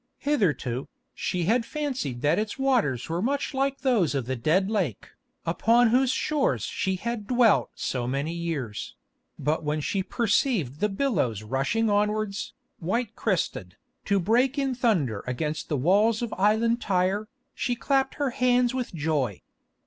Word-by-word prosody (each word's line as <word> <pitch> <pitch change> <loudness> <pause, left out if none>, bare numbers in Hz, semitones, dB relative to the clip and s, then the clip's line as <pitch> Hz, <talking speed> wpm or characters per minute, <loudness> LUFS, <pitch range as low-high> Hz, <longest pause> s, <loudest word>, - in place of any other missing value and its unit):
Hitherto, 150 - 0 0.3
she 180 -1 -2
had 230 +7 +2
fancied 255 - -3
that 150 +6 +3
its 215 +3 -3
waters 240 - +1
were 165 +2 -2
much 280 +5 -1
like 275 +1 -1
those 225 - +2
of 135 -4 -1
the 130 +2 -2
Dead 160 +11 +2
Lake, 190 - -2 0.4
upon 230 +8 +3
whose 255 +2 +3
shores 290 +2 0
she 190 0 -1
had 225 +1 -4
dwelt 240 -3 +4
so 125 -2 -2
many 140 +5 -2
years; 160 -11 -4 0.4
but 150 +3 -1
when 150 +1 -1
she 190 +6 -1
perceived 200 - 0
the 210 - +1
billows 195 - 0
rushing 135 - 0
onwards, 210 0 0 0.3
white 205 +6 -2
crested, 155 - -2 0.3
to 200 0 +2
break 245 - +2
in 270 -2 0
thunder 180 - 0
against 150 +5 -3
the 150 - 0
walls 205 - +3
of 235 - -3
island 220 +4 +2
Tyre, 195 +2 0 0.3
she 245 - -1
clapped 270 +2 0
her 285 -3 -1
hands 250 0 +2
with 250 -8 -3
joy. 145 - -1
205 Hz, 150 wpm, -26 LUFS, 150-245 Hz, 0.4 s, dwelt